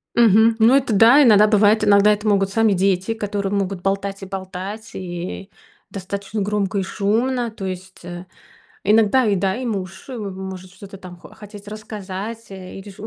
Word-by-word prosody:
Мгм. 225 0 +5
Ну, 230 +3 +5
это 270 -4 +2
да, 230 +8 +6
иногда 210 -5 +6
бывает, 210 0 +3
иногда 205 0 +5
это 210 +1 -3
могут 195 -2 +2
сами 225 +1 +2
дети, 190 +3 0
которые 205 -2 -3
могут 195 -2 -2
болтать 195 +1 -2
и 195 - -6
болтать, 190 +3 -7
и 180 +1 -6 0.4
достаточно 200 +2 -5
громко 205 0 -1
и - - 0
шумно. 230 +6 -1
То 215 -3 -9
есть, 185 0 -8
э, 175 +1 -8 0.6
иногда 220 +4 +3
и, 205 - +2
да, 190 +1 0
и 255 +1 -4
муж, 190 -2 -5
э, 260 - -6
может 190 -3 -7
что-то 195 0 -12
там 185 -2 -11
хо - - -14
хотеть 205 -1 -12
рассказать, 215 +1 -7
э, 190 -1 -10
или 195 +1 -10
ж 195 - -15
у 215 - -6
200 Hz, 185 wpm, -20 LUFS, 190-220 Hz, 0.6 s, да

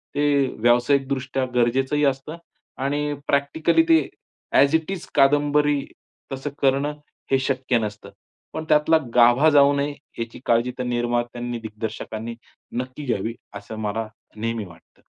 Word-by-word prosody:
ते 145 -2 +2
व्यावसायिकदृष्ट्या 130 +2 +2
गरजेचंही 130 +5 +2
असतं 140 +4 -2 0.5
आणि 145 +1 -1
प्रॅक्टिकली 140 - +2
ते 325 0 +7 0.6
ॲज 140 +3 +5
इट 160 +3 0
इज 190 -3 -5
कादंबरी 145 +1 +3 0.5
तसं 135 +2 -4
करणं 140 +2 +2 0.4
हे 135 - +4
शक्य 130 -2 0
नसतं. 105 -1 -5 0.4
पण 160 - -4
त्यातला 150 +2 +5 0.2
गाभा 120 +6 +6
जाऊ 145 -1 +5
नये 145 +1 -1 0.3
याची 115 0 -5
काळजी 120 +1 +2
त्या 125 - -3
निर्मात्यांनी, 120 0 -2
दिग्दर्शकांनी 110 +1 -6 0.5
नक्की 130 +3 -8
घ्यावी, 115 -2 -1 0.2
असं 100 +2 -8
मला 110 +1 -2 0.3
नेहमी 115 -1 -2
वाटतं. 85 -2 -18
135 Hz, 125 wpm, -23 LUFS, 120-145 Hz, 0.6 s, ते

